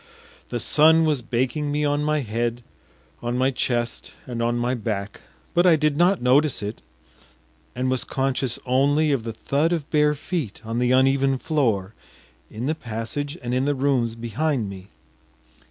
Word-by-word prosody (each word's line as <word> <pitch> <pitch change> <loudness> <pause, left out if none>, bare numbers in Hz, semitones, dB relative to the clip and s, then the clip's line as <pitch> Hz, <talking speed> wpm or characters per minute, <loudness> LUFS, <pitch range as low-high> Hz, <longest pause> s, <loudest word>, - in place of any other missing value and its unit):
The - - -2
sun 160 +1 +5
was 150 -5 +1
baking 130 +5 -1
me 150 0 0
on 145 0 +1
my 150 0 +1
head, 120 +1 -2 0.6
on 120 +1 -2
my 130 +1 +2
chest, 120 -2 -2
and 120 -2 -4
on 120 +1 +1
my 120 +1 0
back, 105 -4 -4 0.3
but 175 +1 +4
I 170 - +7
did 150 -1 +1
not 175 0 +3
notice 130 -1 +3
it, 105 +2 -5 0.9
and 125 +1 -1
was 130 -1 0
conscious 135 -2 -1
only 145 +4 +2
of 135 -4 +1
the 115 0 -5
thud 145 +8 0
of 160 -4 -1
bare 150 -1 +3
feet 150 - -4
on 115 +1 -2
the 125 0 +2
uneven 135 +1 +3
floor 115 - 0 0.6
in 110 +3 -5
the 155 - +1
passage 135 +3 -4
and 120 0 -2
in 130 +1 +1
the 145 0 +1
rooms 130 -4 +1
behind 120 +1 -1
me. 95 -1 -10
130 Hz, 170 wpm, -23 LUFS, 120-150 Hz, 0.9 s, I